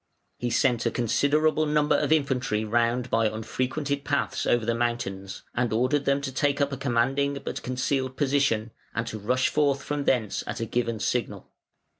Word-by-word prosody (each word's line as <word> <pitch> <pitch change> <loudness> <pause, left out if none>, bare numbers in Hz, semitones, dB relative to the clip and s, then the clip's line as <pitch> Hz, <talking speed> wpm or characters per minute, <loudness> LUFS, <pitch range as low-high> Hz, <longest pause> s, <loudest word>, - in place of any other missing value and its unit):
He 120 - -1
sent 120 0 +2
a - - +3
considerable 150 +7 +2
number 150 0 +3
of - - 0
infantry 130 -8 +1
round 120 +2 +1
by 115 0 +3
unfrequented 130 +6 -2
paths 145 0 -1
over 120 -2 +2
the 115 - +1
mountains, 115 -5 -3
and 120 -1 0
ordered 130 +6 +1
them 140 0 +2
to 135 - -4
take 145 +1 0
up 140 0 +1
a 140 - -3
commanding 135 +2 +1
but - - -4
concealed 130 +1 -1
position, 135 -6 +1 0.2
and 115 - -1
to 110 -2 -5
rush 125 +5 +1
forth 140 -2 +1
from 145 -1 -3
thence 110 -6 +1
at 105 +3 -4
a 115 - -1
given 115 -1 -1
signal. 105 -4 -2
125 Hz, 175 wpm, -26 LUFS, 115-140 Hz, 0.2 s, a